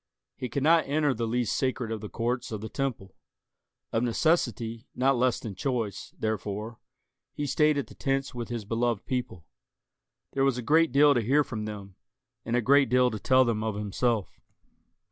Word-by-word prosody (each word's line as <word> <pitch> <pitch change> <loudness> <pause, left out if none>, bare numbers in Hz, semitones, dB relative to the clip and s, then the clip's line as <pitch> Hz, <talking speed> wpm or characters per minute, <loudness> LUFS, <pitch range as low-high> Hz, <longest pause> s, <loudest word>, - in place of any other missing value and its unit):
He 125 - -5
could 135 +4 -2
not 165 +2 +4
enter 145 0 +2
the 115 -1 -2
least 120 0 0
sacred 130 -3 -1
of 110 -2 -4
the 105 - -7
courts 120 +1 -2
of 110 - -3
the 110 +2 -6
Temple. 125 -9 -3 0.8
Of 115 - +2
necessity, 120 -3 0
not 135 +2 +3
less 125 0 +1
than 110 - -6
choice, 110 -2 -3
therefore, 110 +1 -3 0.5
he 145 - -3
stayed 150 +2 +2
at 140 - -1
the - - -14
tents 135 0 -1
with 120 -2 -5
his 120 -3 -4
beloved 115 0 -1
people. 125 -10 -4 0.9
There 135 - 0
was 135 -2 +2
a 125 - -4
great 160 +5 +4
deal 145 +2 +6
to 120 - +1
hear 140 +7 +3
from 110 -6 -5
them, 100 -3 -8 0.5
and 115 - -2
a 125 - +3
great 140 +3 +5
deal 125 0 +4
to 110 - -4
tell 130 +4 +4
them 110 -2 -1
of 110 -2 -2
himself. 105 +1 -1
120 Hz, 185 wpm, -28 LUFS, 110-135 Hz, 0.9 s, deal